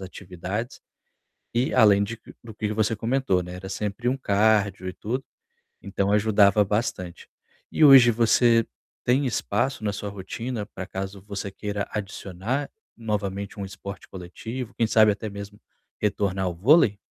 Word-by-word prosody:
atividades, 95 +4 -6 0.7
e 125 +3 +1
além 105 -4 +5
de 115 +3 -4 0.2
do 115 -1 -10
que 105 -1 -2
você 110 0 0
comentou, 115 -4 +1
né, 90 +1 -8
era 95 +1 -8
sempre 105 +4 -3
um 130 - +1
cardio 100 -4 +1
e - - -4
tudo, 125 +8 -4 0.6
então 100 0 -1
ajudava 105 -1 +4
bastante. 100 -4 -3 0.4
E 155 - +3
hoje 130 -4 +9
você 115 0 +4 0.4
tem 130 +3 +2
espaço 125 0 -1
na 105 - 0
sua 100 0 -5
rotina, 105 +4 -5
pra 95 -3 -8
caso 95 0 -6
você 100 0 -6
queira 100 +1 -4
adicionar 105 +5 -4 0.3
novamente 100 -3 -3
um 100 - -3
esporte 95 -1 -9
coletivo? 110 +7 -7
Quem 115 - +1
sabe 110 -1 +5
até 110 +2 -6
mesmo 100 0 -9 0.4
retornar 100 -2 0
ao 90 - -2
vôlei? 110 - +4
105 Hz, 145 wpm, -25 LUFS, 95-115 Hz, 0.7 s, hoje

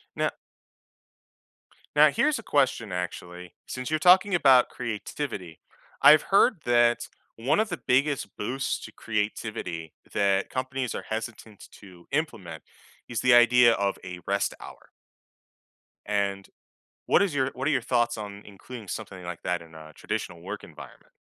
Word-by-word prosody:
Now - - 0 1.6
Now - - +7
here's 300 -5 +1
a 225 - -10
question 130 -7 +1
actually: 90 0 -6
since 130 -1 -5
you're 155 0 0
talking 185 +3 +5
about 130 -6 +5
creativity, 105 - -5 0.4
I've 155 0 +8
heard 195 - +3
that 120 0 +3 0.3
one 125 - +1
of 220 - +2
the 175 - -3
biggest 140 +1 +1
boosts 130 +6 -2
to - - -11
creativity 105 -6 -4 0.2
that 100 -1 +1
companies 130 -1 -3
are - - -5
hesitant 110 -1 -6
to 90 -4 -15
implement 110 - -3 0.5
is 115 -3 -2
the 125 -1 +5
idea 120 0 +6
of 100 -2 -1
a 90 -1 -7
rest 100 0 0
hour. - - -13 1.1
And 100 -1 -1 0.6
what - - +4
is 185 -7 0
your 135 -1 +1
what 130 +4 -2
are - - +2
your 135 -5 +1
thoughts 120 -1 +1
on 105 -1 -7
including 105 +2 -11
something 95 -2 -6
like 85 -1 -7
that 90 -1 -2
in 80 -1 -16
a 80 0 -12
traditional 85 - -5
work 100 +3 -7
environment? - - -14
115 Hz, 145 wpm, -26 LUFS, 95-130 Hz, 1.6 s, I've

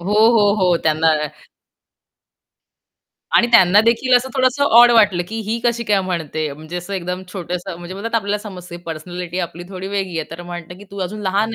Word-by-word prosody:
हो, 195 +4 -2 0.2
हो, 205 -3 +4
हो 180 -2 +4
त्यांना 160 +1 +2 2.3
आणि 235 - +5
त्यांना 195 -2 +7
देखील 250 +2 +3
असं 255 +2 -1
थोडंसं 260 +2 +2
ऑड 240 -2 +7
वाटलं, 205 -6 +4
की 225 - -5
ही 230 - -1
कशी 235 0 0
काय 205 -2 +2
म्हणते? 160 -4 -3
म्हणजे 155 +4 -8
असं 175 +3 -6
एकदम 180 0 -4
छोटंसं 180 -1 -5
म्हणजे 175 +1 -8 0.2
आपल्याला 205 -1 -1
समजते 180 -4 -9
पर्सनॅलिटी 175 +2 -6
आपली 175 -1 -4
थोडी 190 0 -7
वेगळी 190 -4 -3
आहे. 160 - -5
तर 170 +1 -8
म्हणतं, 175 0 -8
की 205 - -12
"तू 200 - -9
अजून 210 +4 -5
लहान 205 +4 0
185 Hz, 175 wpm, -19 LUFS, 175-210 Hz, 2.3 s, त्यांना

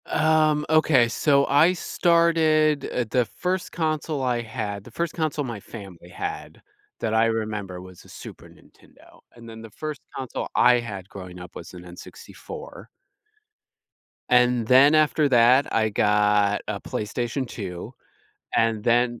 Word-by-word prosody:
Um, 155 -1 +2
okay, 155 -6 +4
so 140 +4 +2
I 155 +6 +4
started 165 -4 +2
uh, 125 - -1
the 125 +1 +1
first 185 +6 -3
console 155 -3 -2
I 125 -2 0
had 110 -3 -5
the - - -13
first 170 -2 -3
console 155 -3 -2
my 115 -4 -6
family 95 -5 -12
had - - -7 0.4
that 110 -1 -1
I 110 +1 +3
remember 105 -5 -3
was 95 -1 -14
a - - -18
Super - - -11
Nintendo, - - -21 0.2
and 115 -1 -13
then 110 0 -10
the 115 - -11
first 155 +7 -7
console 130 -3 -5
I 125 0 +5
had 100 -6 -7
growing 90 -2 -10
up 90 -1 -12
was 85 - -10
an 90 - -10
N64 455 - -11 1.4
and 125 -1 +3
then 135 +5 +6
after 155 -1 +3
that, 125 +2 +4
I 110 -1 +2
got 105 -1 +2
a 100 -1 -3
PlayStation 120 +6 -4
2, 90 -7 -7 0.7
and 115 -2 +1
then 120 +1 +1
120 Hz, 145 wpm, -24 LUFS, 105-150 Hz, 1.4 s, then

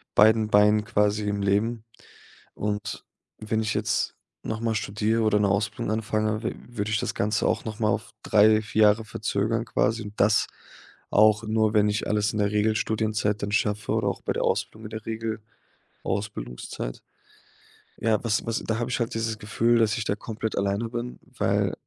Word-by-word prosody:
beiden 110 +1 +5
Beinen 105 0 +5
quasi 105 -2 +1
im 100 0 -1
Leben.“ 105 +3 0 0.7
Und 105 0 -3 0.3
wenn 110 +1 -1
ich 110 0 -1
jetzt - - 0 0.3
noch 110 0 -4
mal 115 -1 0
studiere 110 +2 0
oder 105 -1 +3
'ne 105 - +3
Ausbildung 100 +2 -1
anfange, 110 0 -1
w 115 - -2
würde 110 -3 -3
ich 105 - +2
das - - -2
Ganze 105 0 0
auch - - 0
noch 110 0 -5
mal 110 -2 +2
auf - - -2
3, 110 +1 +5
4 110 0 +1
Jahre 105 +1 +4
verzögern 110 +1 -1
quasi. 110 0 0
Und 105 0 -8
das 105 +2 +4 0.6
auch 105 +1 +5
nur, 110 -1 +1
wenn 105 -1 +4
ich 105 0 -1
alles 105 0 +1
in 105 - -2
der 100 0 +1
Regelstudienzeit 110 0 0
dann 100 - -2
schaffe 105 0 0
oder - - +1
auch - - -5
bei - - -1
der - - -1
Ausbildung 110 0 -1
in 105 - -8
der 110 -1 -7 0.8
Regelausbildungszeit. 60 - -5 1.0
Ja, 110 -1 +3
was 110 -2 +1
was 115 -1 -1
da 110 0 -1
habe 120 +1 -2
ich - - 0
halt 115 -2 -2
dieses 115 -1 -2
Gefühl, 115 +3 +2
dass 110 -2 +2
ich 115 - -2
da 100 - -1
komplett 110 0 -4
alleine 100 +3 0
bin, 120 +1 -5 0.2
weil, - - +1
110 Hz, 180 wpm, -26 LUFS, 105-110 Hz, 1.0 s, beiden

